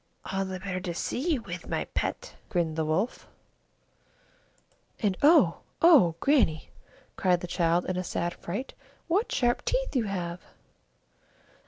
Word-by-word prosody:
"All 195 0 0
the 190 -1 -5
better 185 -1 -4
to 175 -2 -5
see 310 - -1
you 250 -6 -2
with, 175 -2 -7
my - - -1
pet," - - -3 0.2
grinned 170 -4 0
the 160 - 0
Wolf. 185 +10 -1 1.7
"And 205 -4 +1
oh! 290 - +5 0.2
oh! 275 - +6
Grannie," 250 - +2 0.5
cried 180 -2 +2
the - - -4
child, 170 0 +1
in 185 - -2
a 185 - -1
sad 175 0 -2
fright, 205 +10 -5 0.3
"what 380 +7 +1
great - - -13
sharp 240 -1 +1
teeth - - -1
you 240 -4 +2
have!" 180 -3 -4
185 Hz, 150 wpm, -28 LUFS, 175-255 Hz, 1.7 s, oh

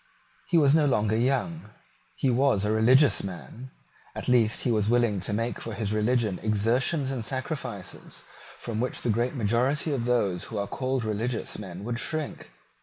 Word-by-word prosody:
He 175 - +3
was 145 -3 +5
no 155 -2 +4
longer 110 -4 +2
young. 135 - 0 0.5
He 135 - +1
was 125 -5 +2
a 105 - +1
religious 130 +6 +5
man; 100 +7 -8 0.5
at - - -5
least 120 -3 +3
he 125 - +1
was 105 -2 +1
willing 120 -4 +2
to 95 - -3
make 115 +3 -1
for 115 - -5
his 105 0 -2
religion 110 -2 +1
exertions 120 +7 +1
and 130 -4 -3
sacrifices 130 - -5 0.3
from 110 -2 -4
which 125 +2 -2
the 120 - +2
great 120 +5 0
majority 125 +7 +1
of 120 -4 -1
those 100 -8 +1
who 110 - -6
are 100 - -1
called 130 +3 -2
religious 110 +3 -2
men 95 -2 -8
would 120 +2 -3
shrink. 155 +1 -4
120 Hz, 175 wpm, -27 LUFS, 105-130 Hz, 0.5 s, was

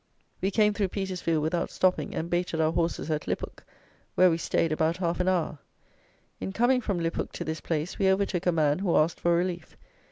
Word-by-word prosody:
We 190 - +1
came 210 +1 +3
through 205 -1 0
Petersfield 180 -5 -2
without 170 +2 -1
stopping, 185 -1 0
and 165 - -2
baited 175 -1 -1
our 160 0 +3
horses 165 -1 -1
at 150 -1 -2
Lyphook, - - -4 0.5
where 185 -1 +6
we 165 - +1
stayed 165 -1 0
about 160 +2 +1
half 175 -2 -1
an 180 - 0
hour. 170 -5 0 0.8
In 190 - -4
coming 250 +4 +3
from 200 -6 -2
Lyphook 165 0 -2
to - - -4
this 160 0 -4
place, 160 +1 -3
we 195 -1 +4
overtook 190 -2 0
a - - +5
man 155 -1 +2
who 185 -3 +1
asked 160 +2 +2
for 170 0 +2
relief. 175 -1 -3
175 Hz, 200 wpm, -27 LUFS, 160-190 Hz, 0.8 s, where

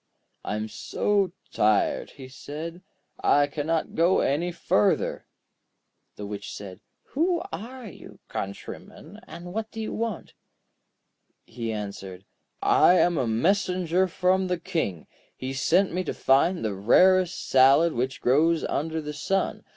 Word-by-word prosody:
'I - - -3
am 105 +1 -3
so 200 - 0 0.2
tired,' 105 -1 +1
he 135 -2 -11
said; 155 +6 -8 0.4
'I 145 0 +4
cannot 155 +3 -2
go 170 +3 +3
any 165 +6 0
further.' 105 -11 0 0.9
The 105 - -7
Witch 100 0 -6
said: 95 -1 -9 0.3
'Who 340 +4 0
are 240 +8 -7
you, 195 - -12
countryman, 155 - -8
and 175 +1 -9
what 220 +1 -3
do 225 - -9
you 220 - -4
want?' 225 -4 -4 1.1
He 115 -2 -5
answered: 100 -3 -7 0.4
'I 180 - +5
am 175 -2 +3
a 125 - 0
messenger 180 - +1
from 185 +1 +1
the 180 -1 -1
King. 160 - -3 0.3
He 130 +1 -4
sent 175 +7 +2
me 185 +1 -1
to - - -3
find 140 +3 +2
the 105 - -1
rarest 185 - +3
salad 135 +5 +5
which 130 +3 -2
grows 160 +6 +3
under 160 +2 -2
the 150 0 -5
sun. 195 +6 -1
165 Hz, 135 wpm, -26 LUFS, 125-185 Hz, 1.1 s, I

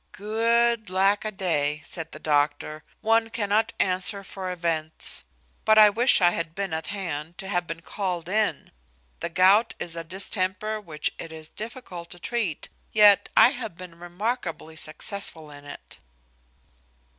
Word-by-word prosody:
"Good 230 +1 +1
lack 195 +3 +2
a - - 0
day!" 150 -7 0
says 165 -3 -4
the - - -10
doctor. 150 +1 0 0.2
"One 225 +1 +2
cannot 215 -1 0
answer 190 +2 +1
for 190 -1 -6
events; 165 -3 -1 0.4
but 220 0 +4
I 210 -1 +9
wish 240 +2 +4
I 175 -1 +6
had 165 -1 -3
been 195 -3 -3
at 160 0 -3
hand, 170 -5 -4
to 190 - -6
have 175 -3 -1
been 165 0 -6
called 180 -5 -3
in. 210 +3 0 0.5
The - - -3
gout 190 +6 +4
is 170 -1 -4
a 165 - -4
distemper 190 +4 -2
which 155 -6 -3
it 165 - -7
is 160 -1 -10
difficult 210 -7 -8
to 175 - -11
treat; 205 -6 -2 0.2
yet 210 -2 +6
I - - +9
have 225 -9 -6
been 180 -2 -11
remarkably 175 -2 -4
successful 160 0 -1
in 145 0 -12
it." 145 - -11
185 Hz, 155 wpm, -25 LUFS, 165-215 Hz, 0.5 s, I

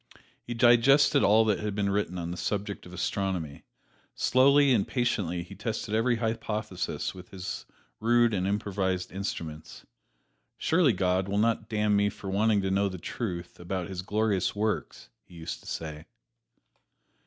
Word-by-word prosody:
He 120 - -6
digested 135 +4 +5
all 110 +2 +5
that 105 -3 +1
had 105 -1 -3
been 100 -1 0
written 100 -3 -1
on 85 -1 -4
the - - -4
subject 100 +1 -3
of - - -12
astronomy; 90 -7 -2 0.5
slowly 140 +1 +5
and 105 -5 +2
patiently 100 -9 -1
he 90 - -12
tested 105 +1 -4
every 115 +2 +2
hypothesis 110 -4 -3
with 90 -1 -12
his 95 -1 -6 0.3
rude 120 0 +3
and 95 -1 0
improvised 95 -3 -1
instruments. 80 -5 -6 0.7
"Surely 160 -6 +3
God 95 0 +1
will 100 +1 -1
not 110 0 +1
damn 105 -1 +2
me 100 0 +3
for 95 -1 -7
wanting 105 0 +2
to 95 - 0
know 100 +1 +2
the 95 - -6
truth 90 -2 -5
about 90 +1 -4
His 95 -2 -4
glorious 105 0 0
works," 110 +1 -2
he 90 - -17
used 80 -1 -6
to - - -17
say. 75 -1 -6
100 Hz, 155 wpm, -28 LUFS, 90-110 Hz, 0.7 s, digested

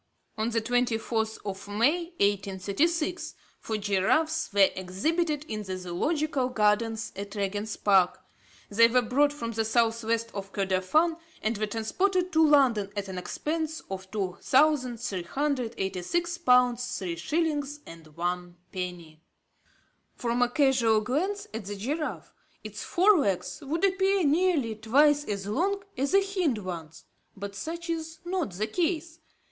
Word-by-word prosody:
On 220 +1 -1
the 230 -1 0
24th 225 -2 0
of 195 0 -5
May, 260 +12 +2
1836, 205 - 0 0.2
four 220 - -3
giraffes 210 +11 +1
were 200 -1 +5
exhibited 300 - -1
in 215 -1 -4
the 190 -2 -5
Zoological 260 - -1
gardens 215 -1 +1
at 200 +2 -7
Regent's 205 +1 -2
Park. 190 -3 +3 0.5
They 230 +3 +6
were 245 +1 +3
brought 285 +5 +3
from 235 -6 -5
the 225 0 0
south 230 +1 +1
west 230 +1 -1
of 195 -1 -6
Kordofan, 195 - +1 0.3
and 220 +2 0
were 215 +1 -1
transported 365 - 0
to 320 -1 +4
London 260 -10 +4
at 200 -1 -3
an 185 -1 -4
expense 315 - -3
of 190 0 -6
2386 245 - 0
pounds 250 -4 +3
three 180 -3 -3
shillings 295 - -1
and 165 -1 -12
one 175 0 -3
penny. 175 -4 -6 0.9
From 240 0 -1
a 245 - +4
casual 245 -5 +3
glance 360 - -1
at 220 -2 -5
the 205 +1 -5
giraffe, 290 +10 -4 0.3
its - - -7
fore 375 +1 +4
legs 195 -9 -1
would 320 +6 0
appear 385 0 +2
nearly 305 -6 +2
twice 285 +7 +3
as 200 -2 -3
long 390 - 0
as 275 +6 -1
the 395 0 +5
hind 365 - 0
ones, 170 -5 -7 0.3
but 200 0 -6
such 335 - -5
is 325 -1 -4
not 350 - -2
the 205 +4 -1
case. 330 +4 -2
230 Hz, 140 wpm, -28 LUFS, 200-310 Hz, 0.9 s, They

